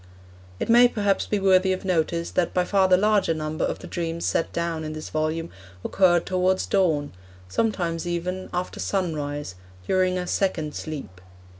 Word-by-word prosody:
It - - -2
may, 240 +2 +7
perhaps, 205 -4 0
be 210 - 0
worthy 190 -1 +4
of 185 - -5
notice 170 -2 0
that 175 - 0
by 180 -1 +2
far 190 0 +3
the 185 -1 +5
larger 205 -4 +2
number 155 0 -3
of - - -1
the - - -11
dreams 170 -1 -3
set 165 - 0
down 170 -1 -2
in 155 0 -5
this 155 0 -7
volume 155 +2 -2 0.3
occurred 175 -3 +3
towards 185 0 +1
dawn; 160 -7 +1 0.4
sometimes 175 - -1
even, 180 +2 -3
after 180 +1 -3
sunrise, 145 - -2 0.3
during 185 - +2
a 180 - -2
'second 170 -5 -1
sleep.' 135 - -7
175 Hz, 165 wpm, -24 LUFS, 160-190 Hz, 0.4 s, may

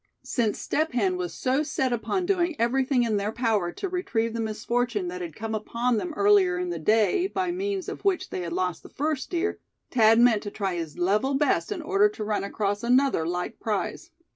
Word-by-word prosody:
Since 230 -4 0
Step 315 -2 -1
Hen 195 -7 +1
was 180 -1 -3
so 260 +3 0
set 280 -4 -1
upon 355 - -1
doing 350 -3 +1
everything 255 +2 +2
in 220 -3 +1
their 200 +1 -1
power 220 -7 0
to 390 - -4
retrieve 235 -12 -1
the 230 - -2
misfortune 225 -2 -1
that 180 0 -6
had 165 -3 -6
come 220 0 -4
upon 235 +2 0
them 350 +9 -3
earlier 200 -3 +4
in 180 0 -2
the 170 - -4
day, 220 - +3
by 375 -2 -1
means 385 +1 -2
of - - -6
which 390 -3 0
they 185 - -3
had 170 -1 -4
lost 180 -1 -1
the - - -13
first 300 -1 -2
deer, 360 +4 -1 0.3
Thad 225 -2 +5
meant 235 -3 +5
to 205 - -5
try 195 -2 -2
his 165 -3 -5
level 210 +10 +1
best 295 +8 +1
in 355 -6 -3
order 400 +5 +3
to 410 - -6
run 210 -1 -1
across 205 0 -2
another 250 -8 +2
like 180 +1 -3
prize. 220 - -3
230 Hz, 210 wpm, -26 LUFS, 200-300 Hz, 0.3 s, Thad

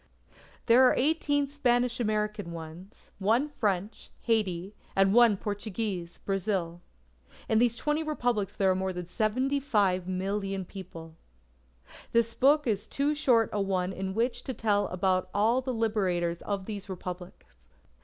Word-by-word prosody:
There 245 +2 +6
are - - +3
eighteen 290 0 +2
Spanish 250 -3 +1
American 210 -4 -1
ones; 170 +4 -10
one 225 +8 +2
French, 210 -7 -2
Haiti; 195 -4 0 0.2
and 195 0 +4
one 235 -3 +6
Portuguese, 205 -4 -4
Brazil. 190 -3 -1 0.7
In 220 - +3
these 235 -1 +2
twenty 300 +4 0
Republics 245 -10 -1
there 190 -1 +3
are - - +1
more 190 0 -2
than 180 -1 -5
75,000,000 195 -5 0
people. 165 -4 -10 1.0
This 230 0 +2
book 295 +5 +4
is 210 -4 -1
too 285 +2 0
short 245 -7 +2
a 205 - 0
one 190 -1 -1
in 190 0 -4
which 240 +2 0
to 260 - -4
tell 205 -2 +1
about 185 0 0
all 225 +5 +3
the 260 0 -3
Liberators 190 -7 0
of 200 -2 -3
these 205 -2 -6
Republics. 180 - -9
205 Hz, 135 wpm, -28 LUFS, 185-240 Hz, 1.0 s, There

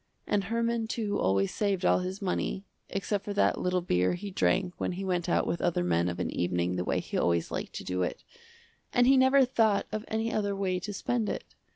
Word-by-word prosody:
And 200 -2 0
Herman 230 +1 0
too 215 -2 -2
always 95 +1 +1
saved 195 -3 0
all - - +4
his 185 +2 -4
money, 190 +1 -2 0.2
except 195 +1 -2
for 205 - -4
that - - +2
little 180 0 +1
beer 90 - +1
he 200 +3 -6
drank 185 -1 +1
when - - -1
he 190 +2 -4
went 180 -2 -1
out - - +2
with 170 - -2
other 170 - +1
men 85 0 +1
of 85 - -5
an - - -1
evening 90 0 0
the 90 - -1
way - - 0
he - - -3
always 85 -1 +1
liked - - -4
to - - -6
do 90 0 -2
it, 90 - -2 0.7
and 245 -1 +4
he 270 +2 +6
never 265 +1 +5
thought 220 -5 +2
of 215 0 -3
any 225 +1 -1
other 205 -2 0
way 185 -2 -1
to 205 +3 -5
spend 225 +2 -1
it. - - -5
195 Hz, 225 wpm, -29 LUFS, 170-215 Hz, 0.7 s, he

